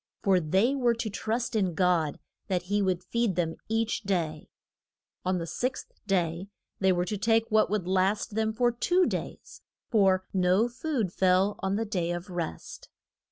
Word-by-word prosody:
For 190 Hz, -2 st, +4 dB
they 190 Hz, -, +2 dB
were 245 Hz, -4 st, +2 dB
to 225 Hz, -2 st, -3 dB
trust 225 Hz, +3 st, -2 dB
in 190 Hz, -6 st, +1 dB
God 170 Hz, -4 st, +2 dB, 0.3 s
that 185 Hz, -3 st, -1 dB
he 205 Hz, +3 st, 0 dB
would 185 Hz, -2 st, 0 dB
feed 230 Hz, 0 st, 0 dB
them 165 Hz, -2 st, -1 dB
each 225 Hz, 0 st, 0 dB
day. 170 Hz, -7 st, -2 dB, 0.7 s
On 185 Hz, 0 st, 0 dB
the 170 Hz, -, -3 dB
sixth 250 Hz, +10 st, -3 dB, 0.2 s
day 175 Hz, -1 st, 0 dB, 0.3 s
they 190 Hz, -1 st, +3 dB
were 175 Hz, -1 st, +1 dB
to 205 Hz, +2 st, -3 dB
take 225 Hz, +1 st, +2 dB
what 215 Hz, 0 st, +4 dB
would 200 Hz, -3 st, -1 dB
last 190 Hz, +4 st, +1 dB
them 220 Hz, 0 st, 0 dB
for 240 Hz, +2 st, +2 dB
two 355 Hz, +10 st, +2 dB
days, -, -, -5 dB, 0.3 s
for 190 Hz, -4 st, +3 dB
no 185 Hz, +4 st, +3 dB
food 240 Hz, -, -2 dB
fell 190 Hz, +2 st, +3 dB
on 190 Hz, 0 st, -1 dB
the 225 Hz, +2 st, -1 dB
day 180 Hz, -5 st, -2 dB
of 175 Hz, +2 st, -4 dB
rest. 170 Hz, -, -6 dB
195 Hz, 170 wpm, -28 LUFS, 180-225 Hz, 0.7 s, For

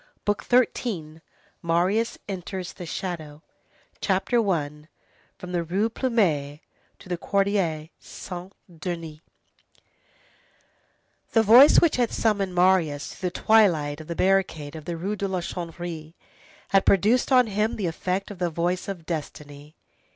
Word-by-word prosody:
BOOK 205 Hz, 0 st, -1 dB
THIRTEENTH—MARIUS 180 Hz, -2 st, -1 dB
ENTERS 185 Hz, -1 st, -5 dB
THE 175 Hz, -, -9 dB
SHADOW 160 Hz, -5 st, -5 dB, 0.6 s
CHAPTER 195 Hz, +5 st, +1 dB
I—FROM 150 Hz, +2 st, -6 dB
THE 175 Hz, -1 st, 0 dB
RUE 195 Hz, +7 st, 0 dB
PLUMET 170 Hz, -, 0 dB, 0.4 s
TO -, -, -15 dB
THE 180 Hz, -1 st, -2 dB
QUARTIER 190 Hz, -7 st, 0 dB
SAINT 180 Hz, +1 st, -9 dB, 0.3 s
DENIS 165 Hz, -2 st, -5 dB, 2.1 s
The 225 Hz, -, +5 dB
voice 245 Hz, +7 st, +8 dB
which 335 Hz, -6 st, +2 dB
had 240 Hz, -2 st, +1 dB
summoned 200 Hz, -4 st, 0 dB
Marius 175 Hz, -5 st, +2 dB
through 185 Hz, -, -3 dB
the -, -, -8 dB
twilight 165 Hz, -10 st, +4 dB
to -, -, -7 dB
the 170 Hz, +2 st, -6 dB
barricade 180 Hz, -6 st, 0 dB
of 155 Hz, -, -9 dB
the 170 Hz, -1 st, -4 dB
Rue 195 Hz, +5 st, -2 dB
de 200 Hz, -1 st, -2 dB
la 190 Hz, -1 st, -2 dB
Chanvrerie, 170 Hz, -2 st, -6 dB, 0.5 s
had 195 Hz, -1 st, +4 dB
produced 215 Hz, +8 st, +3 dB
on 250 Hz, -1 st, +6 dB
him 210 Hz, +1 st, -1 dB
the 205 Hz, -, -3 dB
effect 185 Hz, +4 st, -2 dB
of 195 Hz, -, -10 dB
the 175 Hz, -1 st, 0 dB
voice 175 Hz, +3 st, -2 dB
of 185 Hz, -5 st, -6 dB
destiny. 150 Hz, -2 st, -7 dB
180 Hz, 130 wpm, -25 LUFS, 160-200 Hz, 2.1 s, voice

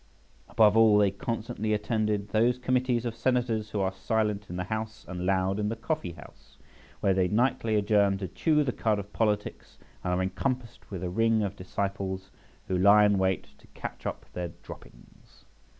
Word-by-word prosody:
Above 105 Hz, -1 st, +5 dB
all, 110 Hz, -2 st, +6 dB
they 100 Hz, -2 st, +4 dB
constantly 110 Hz, +1 st, -3 dB
attended 105 Hz, -1 st, -1 dB
those 120 Hz, +4 st, +2 dB
committees 125 Hz, -1 st, 0 dB
of 115 Hz, -1 st, -3 dB
Senators 115 Hz, -3 st, 0 dB
who 105 Hz, -, -3 dB
are 95 Hz, -1 st, +1 dB
silent 105 Hz, +1 st, -1 dB
in 90 Hz, -, -5 dB
the 90 Hz, -, -2 dB
House 110 Hz, +2 st, -5 dB
and 90 Hz, 0 st, -4 dB
loud 95 Hz, +1 st, +1 dB
in 105 Hz, 0 st, 0 dB
the 115 Hz, -, -2 dB
coffee 115 Hz, -, -3 dB
house, -, -, -16 dB, 0.4 s
where 95 Hz, -, +3 dB
they 95 Hz, -1 st, +2 dB
nightly 115 Hz, +1 st, +1 dB
adjourn 100 Hz, -1 st, +3 dB
to 95 Hz, -1 st, -4 dB
chew 150 Hz, -, +2 dB
the 130 Hz, -, -1 dB
cud 110 Hz, -3 st, 0 dB
of 100 Hz, 0 st, -7 dB
politics, 105 Hz, -2 st, -2 dB, 0.3 s
and 90 Hz, -, -1 dB
are 90 Hz, +1 st, +1 dB
encompassed 115 Hz, +6 st, -3 dB
with 95 Hz, -3 st, -6 dB
a 90 Hz, -, -2 dB
ring 115 Hz, +2 st, +2 dB
of 100 Hz, -1 st, -3 dB
disciples 95 Hz, 0 st, -4 dB, 0.4 s
who 95 Hz, -, -1 dB
lie 105 Hz, +2 st, +7 dB
in 100 Hz, -2 st, +3 dB
wait 95 Hz, 0 st, 0 dB
to -, -, -20 dB
catch -, -, -6 dB
up -, -, -5 dB
their 90 Hz, -1 st, -3 dB, 0.2 s
droppings. -, -, -15 dB
105 Hz, 180 wpm, -28 LUFS, 95-115 Hz, 0.4 s, lie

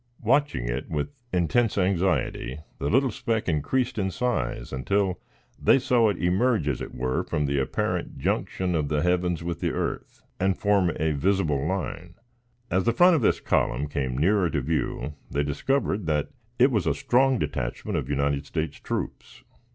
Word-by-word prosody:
Watching 145 Hz, -, +2 dB
it -, -, -3 dB
with 75 Hz, -, -2 dB, 0.2 s
intense 105 Hz, +6 st, +1 dB
anxiety, 90 Hz, -7 st, 0 dB, 0.2 s
the 70 Hz, -, -1 dB
little 130 Hz, +1 st, +3 dB
speck 110 Hz, 0 st, -2 dB
increased 115 Hz, -, 0 dB
in 95 Hz, -1 st, 0 dB
size 125 Hz, -, -2 dB
until 95 Hz, +9 st, 0 dB, 0.4 s
they -, -, +6 dB
saw 125 Hz, -4 st, +3 dB
it 100 Hz, -, -1 dB
emerge, 95 Hz, -, +1 dB
as 70 Hz, -4 st, -1 dB
it -, -, -7 dB
were, 65 Hz, +1 st, -1 dB
from 75 Hz, -, -1 dB
the 70 Hz, 0 st, 0 dB
apparent 65 Hz, -, -2 dB
junction 90 Hz, -1 st, -1 dB
of 75 Hz, -4 st, 0 dB
the 75 Hz, 0 st, +1 dB
heavens 90 Hz, -1 st, +1 dB
with 85 Hz, 0 st, -3 dB
the -, -, 0 dB
earth, -, -, -4 dB, 0.2 s
and 95 Hz, 0 st, +1 dB
form 100 Hz, -4 st, +2 dB
a 80 Hz, +1 st, 0 dB
visible 75 Hz, -2 st, +1 dB
line; 90 Hz, -1 st, -4 dB, 0.6 s
as 95 Hz, 0 st, +2 dB
the 115 Hz, -, +3 dB
front 175 Hz, +7 st, +6 dB
of 155 Hz, -, +1 dB
this -, -, +2 dB
column 70 Hz, +5 st, 0 dB
came 65 Hz, -3 st, -2 dB
nearer 90 Hz, +4 st, +3 dB
to 75 Hz, -, -1 dB
view, 75 Hz, -1 st, -2 dB, 0.2 s
they 70 Hz, -, 0 dB
discovered 100 Hz, -, -1 dB
that 75 Hz, -1 st, 0 dB, 0.3 s
it 130 Hz, +3 st, +5 dB
was 105 Hz, -9 st, 0 dB
a -, -, +2 dB
strong 130 Hz, +1 st, +3 dB
detachment 70 Hz, -, -3 dB
of 65 Hz, -, -2 dB
United 70 Hz, 0 st, 0 dB
States 80 Hz, -3 st, -3 dB
troops. -, -, -5 dB
90 Hz, 170 wpm, -26 LUFS, 75-105 Hz, 0.6 s, they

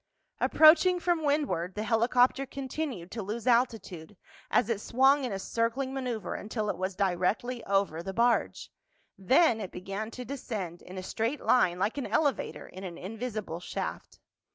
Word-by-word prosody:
Approaching 340 Hz, +3 st, +6 dB
from 345 Hz, -2 st, 0 dB
windward, 280 Hz, -, 0 dB
the 210 Hz, -, -2 dB
helicopter 245 Hz, +4 st, +2 dB
continued 260 Hz, -, -5 dB
to 225 Hz, -, -4 dB
lose 215 Hz, +4 st, -5 dB
altitude 225 Hz, -8 st, 0 dB, 0.3 s
as -, -, +3 dB
it 225 Hz, -3 st, -1 dB
swung 270 Hz, +5 st, +3 dB
in 245 Hz, -, -3 dB
a 195 Hz, -, -2 dB
circling 230 Hz, +6 st, -1 dB
maneuver 245 Hz, -7 st, -3 dB
until 215 Hz, 0 st, -3 dB
it -, -, -7 dB
was 185 Hz, 0 st, -2 dB
directly 200 Hz, +6 st, 0 dB
over 195 Hz, -5 st, +1 dB
the 195 Hz, +3 st, -5 dB
barge. 235 Hz, +4 st, +1 dB, 0.4 s
Then 235 Hz, -, +3 dB
it 190 Hz, -, -5 dB
began 195 Hz, +4 st, -5 dB
to 250 Hz, +2 st, -8 dB
descend 215 Hz, -11 st, -5 dB
in 185 Hz, +1 st, -10 dB
a 185 Hz, -, -5 dB
straight 230 Hz, +9 st, -2 dB
line 180 Hz, -8 st, +3 dB
like 205 Hz, +9 st, -1 dB
an 275 Hz, -, -3 dB
elevator 285 Hz, -4 st, -1 dB
in 185 Hz, -, -10 dB
an 175 Hz, -3 st, -6 dB
invisible 215 Hz, -3 st, -5 dB
shaft. 180 Hz, -, -6 dB
225 Hz, 160 wpm, -29 LUFS, 195-260 Hz, 0.4 s, Approaching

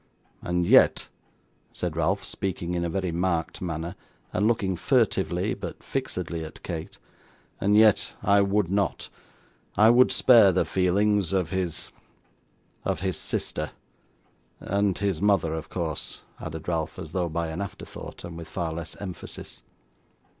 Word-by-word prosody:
And 90 Hz, 0 st, 0 dB
yet,' -, -, +5 dB, 0.6 s
said 85 Hz, -3 st, -3 dB
Ralph, 85 Hz, +5 st, +1 dB
speaking 90 Hz, -3 st, -3 dB
in 85 Hz, -1 st, 0 dB
a 85 Hz, -, -1 dB
very 95 Hz, 0 st, -1 dB
marked 85 Hz, -1 st, -1 dB
manner, 85 Hz, 0 st, -3 dB, 0.4 s
and 105 Hz, -, +2 dB
looking 100 Hz, -5 st, +1 dB
furtively, 85 Hz, -, +1 dB
but -, -, -7 dB
fixedly, 85 Hz, -1 st, -3 dB
at 80 Hz, -, -10 dB
Kate, 80 Hz, -2 st, -5 dB, 0.6 s
'and 105 Hz, +1 st, +3 dB
yet 110 Hz, -2 st, +5 dB
I 100 Hz, 0 st, +5 dB
would 100 Hz, -2 st, +1 dB
not. 100 Hz, 0 st, 0 dB, 0.7 s
I 110 Hz, +2 st, +7 dB
would 125 Hz, +2 st, +6 dB
spare 115 Hz, -6 st, +7 dB
the 90 Hz, -, +2 dB
feelings 100 Hz, 0 st, +2 dB
of 90 Hz, -4 st, 0 dB
his 95 Hz, -3 st, -2 dB, 0.9 s
of -, -, -1 dB
his 95 Hz, -1 st, -1 dB
sister. -, -, -3 dB, 0.9 s
And 100 Hz, -1 st, 0 dB
his 100 Hz, -5 st, -1 dB
mother 95 Hz, -6 st, +3 dB
of 80 Hz, 0 st, -5 dB
course,' 80 Hz, -4 st, -4 dB, 0.2 s
added 80 Hz, 0 st, -7 dB
Ralph, 80 Hz, -2 st, -2 dB
as 80 Hz, -4 st, -7 dB
though 90 Hz, -1 st, -1 dB
by 85 Hz, +1 st, -2 dB
an 80 Hz, +4 st, -4 dB
afterthought, 100 Hz, -, -8 dB
and 85 Hz, -1 st, -7 dB
with 85 Hz, -1 st, -8 dB
far 85 Hz, -1 st, -3 dB
less 85 Hz, 0 st, -6 dB
emphasis. 95 Hz, -4 st, -7 dB
90 Hz, 145 wpm, -26 LUFS, 85-100 Hz, 0.9 s, I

